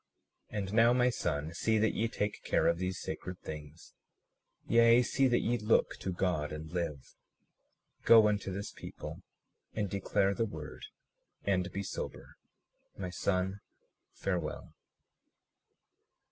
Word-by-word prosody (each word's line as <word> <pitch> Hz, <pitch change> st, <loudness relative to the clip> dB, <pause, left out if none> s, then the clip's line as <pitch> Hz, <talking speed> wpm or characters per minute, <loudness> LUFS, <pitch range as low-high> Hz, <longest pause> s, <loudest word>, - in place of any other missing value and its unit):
37:47 105 Hz, -, -4 dB
And 100 Hz, -1 st, -3 dB
now, 115 Hz, +2 st, +6 dB
my 125 Hz, 0 st, +4 dB
son, 80 Hz, -6 st, -2 dB
see 110 Hz, +5 st, +1 dB
that 110 Hz, +1 st, +2 dB
ye 115 Hz, -, +1 dB
take 105 Hz, -2 st, -3 dB
care -, -, +2 dB
of 85 Hz, 0 st, +3 dB
these 95 Hz, 0 st, -2 dB
sacred 90 Hz, 0 st, -5 dB
things, 75 Hz, +1 st, -9 dB, 0.7 s
yea, 115 Hz, +1 st, +6 dB
see 135 Hz, +3 st, +2 dB
that 120 Hz, -1 st, +3 dB
ye 120 Hz, +1 st, 0 dB
look 105 Hz, +1 st, +2 dB
to 95 Hz, -, -3 dB
God 90 Hz, -5 st, 0 dB
and 75 Hz, +1 st, -6 dB
live. 85 Hz, -6 st, -4 dB, 0.9 s
Go 110 Hz, -2 st, +8 dB
unto 105 Hz, -2 st, 0 dB
this 100 Hz, +2 st, -4 dB
people -, -, -8 dB, 0.5 s
and 105 Hz, -3 st, -1 dB
declare 100 Hz, 0 st, +1 dB
the 115 Hz, +2 st, 0 dB
word, 80 Hz, -5 st, -8 dB, 0.6 s
and 95 Hz, -2 st, 0 dB
be 100 Hz, -, -3 dB
sober. -, -, -6 dB, 0.6 s
My 90 Hz, -2 st, -4 dB
son, 95 Hz, +2 st, 0 dB, 0.6 s
farewell. -, -, -3 dB
95 Hz, 135 wpm, -32 LUFS, 85-110 Hz, 0.9 s, Go